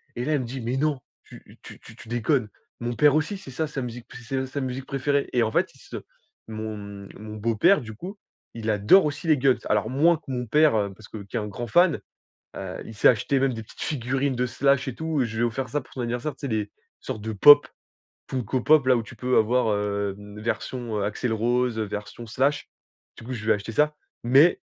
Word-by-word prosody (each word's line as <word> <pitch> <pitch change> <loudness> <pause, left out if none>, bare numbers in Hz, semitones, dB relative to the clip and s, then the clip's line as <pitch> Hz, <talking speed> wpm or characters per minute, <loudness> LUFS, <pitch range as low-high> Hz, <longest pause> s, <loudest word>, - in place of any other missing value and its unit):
et 120 - -3
là, 155 - 0
il 145 - +2
me - - -2
dit: 130 +3 -6
«Mais 120 +3 -2
non! 150 -2 0 0.2
Tu - - -16
tu - - -12
tu - - -14
tu - - -14
déconnes! 120 0 0 0.3
Mon 120 0 -3
père 145 +4 +5
aussi 155 +6 0
c'est 190 -8 -11
ça 155 +5 -2
sa 140 -3 -4
musique 120 0 -7
c'est 125 +2 -5
s 130 - -1
sa 140 - -3
musique 130 0 -4
préférée» 140 +1 0
et 120 -2 +3
en 110 - -1
fait, - - +1
ils - - -20
se - - -8 0.5
mon, 110 0 -5
hem, 100 -1 -9
mon 105 0 -8
beau-père, 115 - +3
du 110 -3 -8
coup, 185 - -8 0.4
il 110 -1 -1
adore 105 - +5
aussi 150 +2 -3
les 155 - +5
Guns, 130 -1 +3
alors 105 +1 +1
moins 160 +6 +4
que 155 - -26
mon 125 -2 -3
père 150 +6 +5 0.2
parce 110 +1 -14
que 110 - -7
qui 100 - -11
est - - +1
un 105 - -4
grand 120 +3 -6
fan, 175 +7 +4 0.6
heu, - - -6
il 110 - -10
s'est - - +6
acheté 125 +4 +1
même 135 -1 +2
des 115 -1 -6
petites - - -14
figurines 135 0 -1
de 125 +1 0
Slash 140 +3 +1
et 130 - -4
tout, 160 -4 -1
je 115 - -6
lui - - 0
ai - - +4
offert 125 +3 -2
ça 145 +4 -1
pour - - -21
son - - -9
anniversaire, 120 +5 -2
c'est 140 - -5
les 110 -4 -2 0.3
sortes - - -5
de 110 +1 -4
Pop 145 +8 +8 0.6
Funko 130 0 -1
Pop-là, 135 -3 +5
où 115 - -1
tu 110 - -12
peux 125 +3 0
avoir, 120 +2 +3
heu, 100 -1 -1 0.2
version 115 0 -3
Axel 105 +4 -1
Rose, 120 +1 0
version 105 +2 -5
Slash, 135 +6 0 0.5
du - - -11
coup, 130 - -5
je 110 -4 -6
lui 110 - +2
ai - - +5
acheté 105 +2 -7
ça 150 +5 +2 0.3
mais 135 +8 +5
125 Hz, 235 wpm, -25 LUFS, 110-140 Hz, 0.6 s, Pop